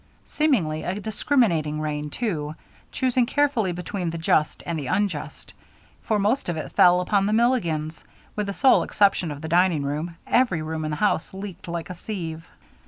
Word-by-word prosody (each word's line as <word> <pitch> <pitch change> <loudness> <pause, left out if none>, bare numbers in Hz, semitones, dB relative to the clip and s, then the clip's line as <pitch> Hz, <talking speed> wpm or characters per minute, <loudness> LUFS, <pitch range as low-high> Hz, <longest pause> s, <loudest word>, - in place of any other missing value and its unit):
Seemingly 190 - +1
a 180 - -3
discriminating 200 - +1
rain, 150 -1 -3
too, 155 -7 -3 0.4
choosing 255 -2 +1
carefully 270 -9 +1
between 180 +1 -4
the 165 - -4
just 155 -2 +1
and 170 -2 -2
the 140 - -5
unjust, 180 -6 -2 0.5
for 215 - 0
most 205 +2 0
of 170 - -2
it 155 - -5
fell 180 -2 +5
upon 195 +2 +1
the 210 - +1
Milligans. 170 -10 0 0.3
With 210 -1 -2
the 200 - -3
sole 265 -2 +5
exception 195 -4 +2
of 145 -1 -6
the 160 - -5
dining 170 -2 +3
room, 155 +4 -3
every 210 -11 +2
room 155 0 -3
in - - -2
the 150 - -3
house 190 -1 0
leaked 195 -3 -8
like 170 0 -4
a - - -4
sieve. 165 -4 -6
175 Hz, 175 wpm, -24 LUFS, 155-210 Hz, 0.5 s, fell